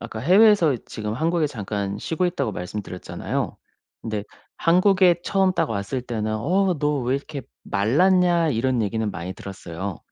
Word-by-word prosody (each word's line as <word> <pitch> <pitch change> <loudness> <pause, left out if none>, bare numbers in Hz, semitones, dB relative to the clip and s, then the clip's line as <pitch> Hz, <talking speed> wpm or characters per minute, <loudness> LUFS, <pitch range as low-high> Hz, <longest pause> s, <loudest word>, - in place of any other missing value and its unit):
아까 115 -2 -7
해외에서 185 - +5
지금 105 -1 -5
한국에 160 +3 +1
잠깐 100 -5 -4
쉬고 170 +8 -1
있다고 175 -10 -1
말씀드렸잖아요. 90 0 -4 0.5
근데 105 -2 -3 0.3
한국에 185 0 +4
처음 190 -2 +2
딱 - - 0
왔을 100 +5 -3
때는 110 -3 -2
"어 185 - +1
너 150 -1 +1
왜 125 +2 0
이렇게 140 -1 -7 0.2
말랐냐?" 175 - +3
이런 125 -1 +1
얘기는 110 +1 -1
많이 90 +2 -5
들었어요. 95 -1 -7
130 Hz, 340 characters per minute, -23 LUFS, 105-175 Hz, 0.5 s, 해외에서